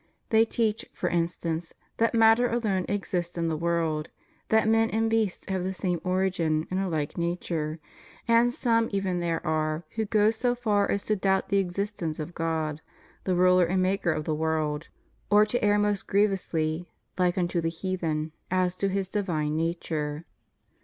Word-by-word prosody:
They 225 0 +5
teach, 225 -1 0
for - - -2
instance, 170 -1 -2 0.2
that 230 +1 +2
matter 225 +2 +5
alone 210 -6 0
exists 180 -4 -2
in 165 -1 0
the 160 - -1
world; 160 -2 -1 0.4
that 220 0 +3
men 225 0 +3
and 225 +1 0
beasts 220 -5 0
have 190 -2 -1
the 190 +1 -3
same 180 -3 -1
origin 180 -4 0
and 185 - 0
a 195 -1 -1
like 155 -1 -2
nature; 170 -2 -2 0.5
and 230 +1 +4
some 230 -2 +1
even 195 -3 -1
there 170 -1 -2
are 155 +1 0
who 225 -1 -2
go 210 +1 +3
so 245 +2 0
far 210 -4 +1
as 200 - -1
to 215 - +1
doubt 190 -1 +1
the 200 - +3
existence 185 -3 -2
of 160 +2 -6
God, 160 -2 -2 0.4
the 185 - +1
Ruler 180 0 +5
and 185 +2 +1
Maker 185 -2 +1
of 155 - -2
the 155 - -1
world, 155 0 -1 0.4
or 210 +1 +6
to 230 +2 -1
err 205 0 +4
most 205 -1 0
grievously, 175 -5 0 0.3
like 180 0 +2
unto 175 -1 0
the 165 - 0
heathen, 165 -3 -2 0.2
as 185 -1 +1
to 195 - 0
His 195 0 -1
divine 170 -7 -1
nature. 160 -2 -2
185 Hz, 175 wpm, -27 LUFS, 165-205 Hz, 0.5 s, or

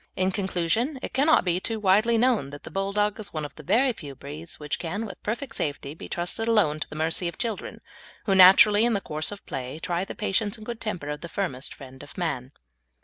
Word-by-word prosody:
In 185 0 +1
conclusion, 195 - 0
it - - -5
cannot 290 0 +4
be 180 0 +1
too 225 +3 -2
widely 215 +4 +4
known 230 - +2
that 145 +1 -10
the - - -9
Bulldog 200 +3 0
is 210 - -5
one 155 -2 -3
of 145 - -8
the - - -11
very 245 - +3
few 145 -9 -9
breeds 150 +5 -8
which 150 -1 -3
can, 200 +6 -3
with 200 - -9
perfect 230 +3 -3
safety, 145 -1 -3
be 160 - -10
trusted 175 +6 -2
alone 205 -10 +3
to - - -4
the - - -8
mercy 160 +3 +1
of 170 - -5
children, 225 -4 -4 0.4
who, 195 - +2
naturally, 200 +3 +8
in 240 0 +3
the 200 - +1
course 155 -3 -3
of 205 - -9
play, 130 +2 -5
try 175 +2 -1
the - - -7
patience 210 +1 0
and 215 - -11
good 235 -1 -6
temper 180 -9 -3
of 150 0 -4
the 170 - -7
firmest 165 -9 -3
friend 130 -1 -12
of 145 - -13
man. 135 -8 -2
185 Hz, 230 wpm, -26 LUFS, 155-215 Hz, 0.4 s, naturally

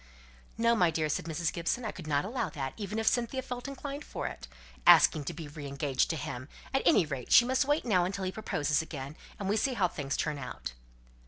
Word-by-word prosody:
"No, 230 +1 +4
my 180 -6 +4
dear," 155 -1 0
said 150 - -1
Mrs. 165 0 -1
Gibson. 175 +8 -1
"I 215 - -2
could 170 -4 -10
not 145 +1 +1
allow 225 -2 -2
that, 135 -3 -4
even 210 0 -4
if 225 - -1
Cynthia 245 +3 +1
felt 250 0 -5
inclined 280 +1 -6
for - - -5
it. - - -6 0.4
Asking 150 - +7
to 170 - -3
be 160 -2 -7
re 145 -1 -8
engaged 140 -1 0
to 165 - 0
him! 130 -2 -5 0.2
At 270 - +3
any 195 - +6
rate, 140 -5 -5
she 240 - +8
must 260 +2 +2
wait 290 +1 +1
now 185 -7 +3
until 195 +2 -2
he 185 - -1
proposes 150 -8 0
again, 145 -3 -7 0.2
and 200 - -4
we 205 +3 +2
see 265 +2 +1
how 190 -5 +3
things 140 -5 -3
turn 150 -1 -1
out." 65 - -6
175 Hz, 230 wpm, -30 LUFS, 145-230 Hz, 0.4 s, she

